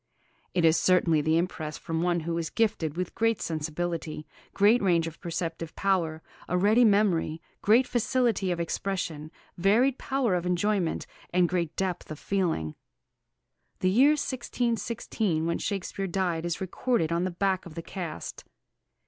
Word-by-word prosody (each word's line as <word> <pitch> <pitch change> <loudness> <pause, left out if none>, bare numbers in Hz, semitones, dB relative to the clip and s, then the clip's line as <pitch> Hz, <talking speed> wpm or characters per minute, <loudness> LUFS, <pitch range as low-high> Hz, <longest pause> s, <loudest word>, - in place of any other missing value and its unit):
It 175 -2 +3
is 160 0 +5
certainly 175 -4 +3
the 160 +2 +2
impress 160 -3 -2
from 165 0 -3
one 175 -1 +1
who 165 +1 -3
was 165 -1 -2
gifted 190 -9 0
with 180 -1 -3
great 225 -1 +1
sensibility, 160 0 -3 0.3
great 205 +4 +4
range 170 -4 +3
of 165 -1 -7
perceptive 165 -1 -4
power, 170 -5 0 0.3
a 180 - +1
ready 210 +6 +5
memory, 200 -7 +3 0.2
great 230 +5 +5
facility 240 -5 +1
of 175 -1 -1
expression, 170 -3 -3 0.3
varied 235 +8 +3
power 265 -6 0
of 180 0 0
enjoyment, 180 -1 0 0.3
and 180 0 +3
great 170 -3 -1
depth 185 -2 -2
of 155 - -6
feeling. 165 - -1 1.1
The 185 - +3
year 270 +9 +6
1616, 235 - -1
when 170 - 0
Shakespeare 195 -1 -3
died, 175 -2 -1
is 170 - -2
recorded 190 -1 0
on 170 +1 +1
the 185 - 0
back 185 +1 -1
of 160 - -12
the 165 - -5
cast. 170 - -6
180 Hz, 150 wpm, -28 LUFS, 165-205 Hz, 1.1 s, year